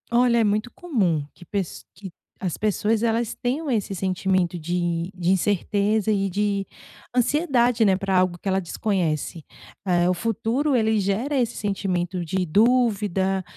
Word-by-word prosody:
Olha 235 0 +3
é - - +4
muito 215 +3 0
comum 190 - 0
que 175 - -15
pes 195 0 -4
que 195 -3 -10 0.3
as 180 -4 -3
pessoas 215 +1 0
elas 230 0 0
tenham 280 +5 -2
esse 215 -5 -1
sentimento 185 -1 0
de 175 +1 -2
de 180 -1 -2
incerteza 205 +3 +1
e 195 -2 +1
de 200 +1 -1 0.5
ansiedade, 250 -3 +2
né, 195 -2 +4
pra 195 -1 0
algo 180 -1 +2
que - - -7
ela 190 0 +2
desconhece. 170 -4 -2 0.4
Eh, 175 -1 +2
o - - +3
futuro 230 - 0
ele 220 -2 +2
gera 205 +9 -1
esse 240 -1 0
sentimento 185 -3 -2
de 185 +3 -1
dúvida, 200 -2 +2
200 Hz, 150 wpm, -24 LUFS, 185-225 Hz, 0.5 s, é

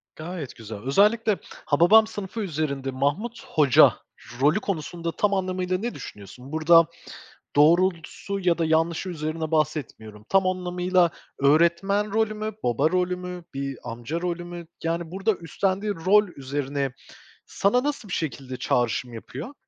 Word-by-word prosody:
Gayet 160 -4 -6
güzel. 110 -2 -8
Özellikle 205 - +2 0.3
Hababam 185 +9 +5
Sınıfı 210 0 -6
üzerinde 145 -7 -2
Mahmut 175 - -2
Hoca 145 -5 +5 0.5
rolü 150 +8 +4
konusunda 170 -3 -3
tam 205 +4 +1
anlamıyla 185 -1 -1
ne 235 +5 -4
düşünüyorsun? 125 +6 -10
Burada 160 +1 +5 0.7
doğrultusu 175 +5 +2
ya 175 -2 +2
da 165 - +1
yanlışı 160 +3 +1
üzerine 160 -1 -3
bahsetmiyorum. 120 -9 -2
Tam 195 -1 +3
anlamıyla 180 -1 +1 0.3
öğretmen 170 +8 +3
rolü 220 0 +1
mü, 215 +1 -4
baba 120 +6 +2
rolü 180 0 +1
mü, 180 -1 -7
bir 135 -1 -4
amca 120 +7 -5
rolü 175 -1 -3
mü? 175 -1 -8 0.2
Yani 165 0 -2
burada 195 +4 0
üstlendiği 195 +4 -1
rol 210 +1 +5
üzerine 140 0 -3 0.5
sana 245 +6 +1
nasıl 285 -7 -3
bir - - -4
şekilde 135 -5 -4
çağrışım 120 0 0
yapıyor? 135 - -8
170 Hz, 135 wpm, -25 LUFS, 145-190 Hz, 0.7 s, Hababam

